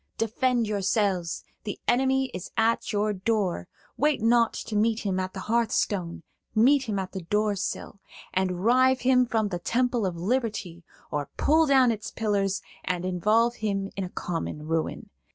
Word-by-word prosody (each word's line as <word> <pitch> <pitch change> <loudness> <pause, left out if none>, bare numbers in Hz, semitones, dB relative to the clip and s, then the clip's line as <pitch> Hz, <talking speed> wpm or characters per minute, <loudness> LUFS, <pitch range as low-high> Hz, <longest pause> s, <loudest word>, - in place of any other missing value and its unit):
Defend 235 +2 +1
yourselves; 195 -4 0 0.2
the 205 - -5
enemy 265 +1 +2
is 180 +1 -6
at 225 +1 +1
your 210 0 +1
door; 195 - -1 0.3
wait 300 +1 +2
not 230 +1 +3
to 215 - -5
meet 220 +2 +2
him 190 -2 -1
at 185 +1 -4
the 190 - -5
hearthstone,–meet 225 - 0
him 205 - -1
at 190 -1 -3
the 190 - -5
door 210 +4 0
sill, 195 +1 -4 0.3
and 185 0 -1
rive 255 +2 +4
him 250 0 +4
from 220 -3 0
the 175 -2 -3
temple 240 +2 0
of 180 - -4
liberty, 200 -4 -2 0.3
or 145 -2 -2
pull 315 +1 +4
down 265 -3 +5
its 220 0 -4
pillars 200 -3 -1 0.2
and 180 -1 -2
involve 215 +6 +2
him 195 -2 -2
in 195 - -2
a 180 - -5
common 165 -4 -4
ruin. 160 0 -2
210 Hz, 160 wpm, -26 LUFS, 185-235 Hz, 0.3 s, down